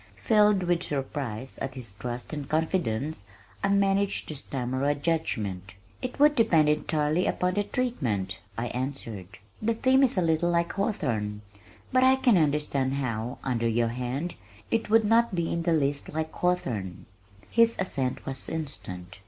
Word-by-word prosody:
Filled 210 Hz, -3 st, +4 dB
with 175 Hz, -1 st, +1 dB
surprise 135 Hz, -5 st, -4 dB
at 130 Hz, -, -4 dB
his 120 Hz, -6 st, -7 dB
trust 120 Hz, +7 st, -6 dB
and 145 Hz, -2 st, -5 dB
confidence, 155 Hz, -, -1 dB, 0.4 s
I -, -, +3 dB
managed 200 Hz, 0 st, +2 dB
to 155 Hz, -, -4 dB
stammer 130 Hz, -1 st, -3 dB
a 145 Hz, +1 st, +2 dB
judgment. 105 Hz, -, -2 dB, 0.3 s
"It 255 Hz, -, -4 dB
would 295 Hz, +1 st, +6 dB
depend 165 Hz, -, +4 dB
entirely 150 Hz, +2 st, +1 dB
upon 180 Hz, 0 st, 0 dB
the 205 Hz, +2 st, +1 dB
treatment," 120 Hz, -, -2 dB, 0.2 s
I 120 Hz, +1 st, -2 dB
answered. 125 Hz, -7 st, -4 dB, 0.3 s
"The 225 Hz, +1 st, +1 dB
theme 260 Hz, +3 st, +4 dB
is 260 Hz, -6 st, +4 dB
a 185 Hz, -, +3 dB
little 165 Hz, +1 st, +2 dB
like 170 Hz, 0 st, +1 dB
Hawthorne, 115 Hz, -, -2 dB, 0.5 s
but 255 Hz, 0 st, +5 dB
I 260 Hz, 0 st, +6 dB
can 255 Hz, -4 st, +4 dB
understand 145 Hz, -3 st, +1 dB
how, 120 Hz, -2 st, -2 dB
under 120 Hz, -3 st, 0 dB
your 115 Hz, +1 st, +1 dB
hand, 125 Hz, +8 st, -3 dB, 0.4 s
it 225 Hz, -2 st, 0 dB
would 225 Hz, 0 st, +5 dB
not 230 Hz, -1 st, +3 dB
be 170 Hz, -1 st, -1 dB
in 170 Hz, -, -1 dB
the 170 Hz, 0 st, +1 dB
least 140 Hz, -2 st, 0 dB
like 160 Hz, 0 st, -2 dB
Hawthorne." 105 Hz, -, -1 dB, 0.5 s
His 230 Hz, 0 st, +4 dB
assent 135 Hz, -9 st, -2 dB
was 135 Hz, -1 st, -4 dB
instant. 100 Hz, -, -6 dB
150 Hz, 160 wpm, -27 LUFS, 125-190 Hz, 0.5 s, would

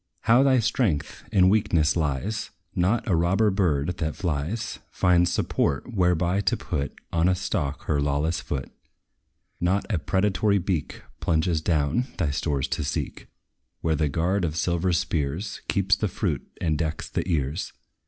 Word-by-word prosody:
How 120 Hz, +3 st, +5 dB
thy 135 Hz, -1 st, +5 dB
strength 110 Hz, -, 0 dB
in 95 Hz, -2 st, +5 dB
weakness 95 Hz, -6 st, +3 dB
lies! 80 Hz, +7 st, -1 dB, 0.2 s
Not 95 Hz, +7 st, +1 dB
a 95 Hz, -, +3 dB
robber 95 Hz, +6 st, +3 dB
bird, 90 Hz, -4 st, +1 dB
that 80 Hz, -2 st, -2 dB
flies, 90 Hz, +6 st, -2 dB
Finds 90 Hz, -1 st, +3 dB
support 70 Hz, -, 0 dB
whereby 90 Hz, 0 st, +2 dB
to -, -, +1 dB
put 70 Hz, 0 st, -3 dB, 0.2 s
On 85 Hz, +1 st, +3 dB
a 95 Hz, -, +3 dB
stalk 80 Hz, -6 st, -2 dB
her 75 Hz, -2 st, 0 dB
lawless 75 Hz, +3 st, 0 dB
foot. 65 Hz, -3 st, -4 dB, 0.9 s
Not 95 Hz, +3 st, +1 dB
a 90 Hz, -, +1 dB
predatory 100 Hz, +4 st, +2 dB
beak 90 Hz, -5 st, -2 dB, 0.2 s
Plunges 80 Hz, 0 st, +1 dB
down, 80 Hz, -, +1 dB
thy 80 Hz, -6 st, 0 dB
stores 70 Hz, -1 st, -1 dB
to 80 Hz, -, -1 dB
seek, 70 Hz, -, -4 dB, 0.5 s
Where 80 Hz, -1 st, +1 dB
the 75 Hz, 0 st, +1 dB
guard 90 Hz, +7 st, 0 dB
of 80 Hz, -3 st, -1 dB
silver 85 Hz, +2 st, +1 dB
spears 80 Hz, +3 st, -1 dB
Keeps 100 Hz, 0 st, +3 dB
the 105 Hz, -, -1 dB
fruit, 90 Hz, -, -2 dB
and 80 Hz, -3 st, 0 dB
decks 80 Hz, -1 st, -2 dB
the -, -, -3 dB
ears. 75 Hz, 0 st, -1 dB
85 Hz, 155 wpm, -25 LUFS, 75-95 Hz, 0.9 s, How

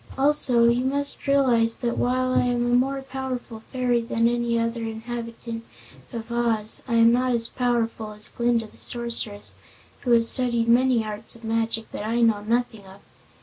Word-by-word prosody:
Also, 265 Hz, -4 st, +3 dB
you 240 Hz, +1 st, +2 dB
must 280 Hz, +2 st, -2 dB
realize 245 Hz, -5 st, +3 dB
that 240 Hz, -1 st, -2 dB
while 255 Hz, +1 st, 0 dB
I -, -, +3 dB
am 245 Hz, -1 st, 0 dB
a 240 Hz, -, 0 dB
more 270 Hz, +2 st, +1 dB
powerful 260 Hz, -3 st, -6 dB
fairy 250 Hz, -2 st, 0 dB
than 230 Hz, 0 st, 0 dB
any 235 Hz, 0 st, 0 dB
other 230 Hz, 0 st, -2 dB
inhabitant 230 Hz, 0 st, -6 dB, 0.5 s
of 230 Hz, -1 st, -7 dB
Oz, 230 Hz, -2 st, +2 dB
I 235 Hz, -, -1 dB
am 230 Hz, 0 st, +6 dB
not 250 Hz, +1 st, +1 dB
as 230 Hz, -1 st, 0 dB
powerful 230 Hz, -3 st, -2 dB
as 210 Hz, 0 st, -7 dB
Glinda 235 Hz, -1 st, 0 dB
the 215 Hz, -, -15 dB
Sorceress, 235 Hz, -4 st, -1 dB, 0.5 s
who 250 Hz, -, -5 dB
has 230 Hz, -1 st, +4 dB
studied 235 Hz, -2 st, +3 dB
many 240 Hz, -1 st, +3 dB
arts 215 Hz, +2 st, -4 dB
of 230 Hz, -, -16 dB
magic 225 Hz, 0 st, -2 dB
that -, -, -5 dB
I 230 Hz, +2 st, -1 dB
know 225 Hz, -3 st, +3 dB
nothing 225 Hz, -2 st, -2 dB
of. 190 Hz, +1 st, -15 dB
235 Hz, 175 wpm, -24 LUFS, 230-245 Hz, 0.5 s, am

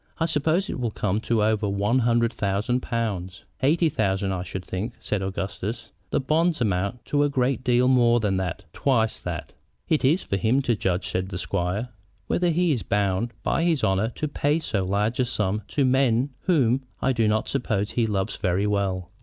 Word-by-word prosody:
"I 165 Hz, -, +1 dB
suppose 160 Hz, +4 st, +1 dB
it -, -, -4 dB
will 120 Hz, -2 st, 0 dB
come 105 Hz, -1 st, -1 dB
to 115 Hz, -2 st, +1 dB
over 110 Hz, -1 st, +1 dB
a 100 Hz, +2 st, 0 dB
hundred 115 Hz, -1 st, +2 dB
thousand 105 Hz, +5 st, 0 dB
pounds." 100 Hz, -7 st, -3 dB, 0.2 s
"Eighty 160 Hz, +5 st, +3 dB
thousand, 100 Hz, -7 st, 0 dB
I 95 Hz, -2 st, -2 dB
should 95 Hz, +1 st, -6 dB
think," 105 Hz, +6 st, -4 dB
said 105 Hz, -, -2 dB
Augustus. 100 Hz, +4 st, -4 dB, 0.2 s
"The -, -, +1 dB
bonds 160 Hz, +5 st, +1 dB
amount 100 Hz, +2 st, -1 dB
to 145 Hz, -, +1 dB
a 145 Hz, -, +3 dB
great 130 Hz, -1 st, 0 dB
deal 125 Hz, 0 st, +3 dB
more 120 Hz, -2 st, +4 dB
than 100 Hz, -4 st, 0 dB
that 90 Hz, -3 st, -3 dB
twice 115 Hz, -5 st, +1 dB
that." -, -, -5 dB, 0.3 s
"It 155 Hz, -, +1 dB
is 155 Hz, +8 st, +3 dB
for 100 Hz, -, -1 dB
him 115 Hz, +8 st, +2 dB
to 120 Hz, -3 st, +1 dB
judge," 90 Hz, -2 st, -1 dB
said 95 Hz, +1 st, -2 dB
the 95 Hz, -, -4 dB
squire, 95 Hz, +5 st, -2 dB, 0.4 s
"whether 175 Hz, 0 st, +1 dB
he 170 Hz, +1 st, +2 dB
is 125 Hz, -6 st, 0 dB
bound 100 Hz, +3 st, 0 dB
by 165 Hz, -, +1 dB
his 165 Hz, -4 st, +1 dB
honor 95 Hz, +3 st, +2 dB
to 155 Hz, -, -2 dB
pay 145 Hz, +1 st, +1 dB
so 110 Hz, -11 st, -1 dB
large 105 Hz, +6 st, 0 dB
a 125 Hz, -, +3 dB
sum 105 Hz, -3 st, -1 dB
to 140 Hz, -, +1 dB
men 130 Hz, 0 st, +2 dB
whom 135 Hz, -8 st, +3 dB, 0.2 s
I 135 Hz, -, +1 dB
do 115 Hz, -3 st, +2 dB
not 110 Hz, +1 st, +1 dB
suppose 110 Hz, -6 st, -1 dB
he 115 Hz, -2 st, +1 dB
loves 95 Hz, -3 st, -1 dB
very 95 Hz, +1 st, 0 dB
well." 95 Hz, -3 st, -1 dB
115 Hz, 195 wpm, -25 LUFS, 100-130 Hz, 0.4 s, more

